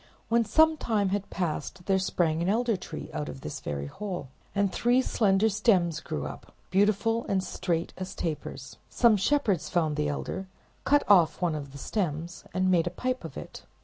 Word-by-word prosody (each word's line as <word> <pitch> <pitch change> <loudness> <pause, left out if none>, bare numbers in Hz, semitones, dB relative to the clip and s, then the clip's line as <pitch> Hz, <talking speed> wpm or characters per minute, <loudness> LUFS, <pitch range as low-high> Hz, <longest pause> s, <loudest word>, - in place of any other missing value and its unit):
When 235 +1 +4
some 315 +6 +4
time 210 -7 +1
had 200 0 -2
passed 175 -1 -2
by, - - -18
there 190 -1 +3
sprang 170 -3 +1
an 175 - +1
elder 230 +2 +2
tree - - -7
out 75 -1 -3
of 70 -2 -8
this - - -5
very 70 -1 -4
hole, 180 - -5 0.3
and 200 -1 +1
three 245 +2 +3
slender 200 -3 +3
sterns 195 -7 +2
grew 75 - -4
up, 70 -2 -9 0.2
beautiful 210 +4 +2
and 190 -1 +1
straight 170 -3 -2
as 185 0 -5
tapers. 145 -4 -5
Some 235 -3 +5
shepherds 205 - +1
found 155 -4 +1
this 150 -1 +1
elder, 190 +6 -4 0.4
cut 290 +1 +4
off 180 -6 +5
one 175 -3 +1
of 140 -3 -5
the 140 - -10
stems, 170 0 -3
and 185 0 +1
made 170 -2 +3
a - - +2
pipe 255 +8 -3
of - - -8
it. - - -9
185 Hz, 190 wpm, -28 LUFS, 160-215 Hz, 0.4 s, Some